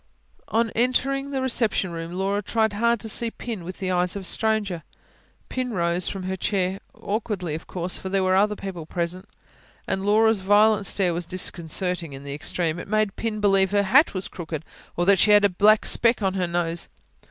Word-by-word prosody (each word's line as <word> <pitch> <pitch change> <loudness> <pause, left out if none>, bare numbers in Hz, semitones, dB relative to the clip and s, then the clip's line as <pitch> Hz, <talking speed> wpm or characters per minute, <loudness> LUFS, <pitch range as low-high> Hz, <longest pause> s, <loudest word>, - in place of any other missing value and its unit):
On 230 0 +1
entering 270 +3 0
the 270 -2 -2
reception 230 -7 0
room 165 0 -6
Laura 195 +2 -1
tried 220 +1 0
hard 235 +2 +1
to 225 - -6
see 230 +2 0
Pin 225 -4 -6
with 180 +2 -7
the 185 -1 -2
eyes 180 +1 +1
of 200 - -5
a - - -8
stranger. 210 -5 0 0.7
Pin 255 -2 -3
rose 170 0 0
from 195 -2 -4
her 190 +1 -2
chair 190 0 -1 0.2
awkwardly, 200 -6 -3
of 160 - -6
course, 180 0 -4
for 190 - -6
there 195 0 +1
were 185 0 +2
other 210 +2 +3
people 185 -6 -7
present, 180 +3 -3 0.6
and 190 - -1
Laura's 220 +1 +3
violent 205 +2 +4
stare 185 -4 +1
was 170 0 -3
disconcerting 175 -2 -2
in 135 +1 -9
the 140 0 -6
extreme: 160 +3 -2
it - - -8
made 215 -1 0
Pin 220 -2 -3
believe 195 -2 +3
her 205 0 +2
hat 250 +6 +4
was 185 - -2
crooked, 160 -3 -6 0.3
or 175 - +1
that 195 0 +5
she - - +4
had 205 0 +6
a - - +4
black 210 +4 +4
speck 230 -2 +4
on 190 -1 +1
her 185 -2 -1
nose. 170 -1 -1
195 Hz, 200 wpm, -24 LUFS, 180-215 Hz, 0.7 s, had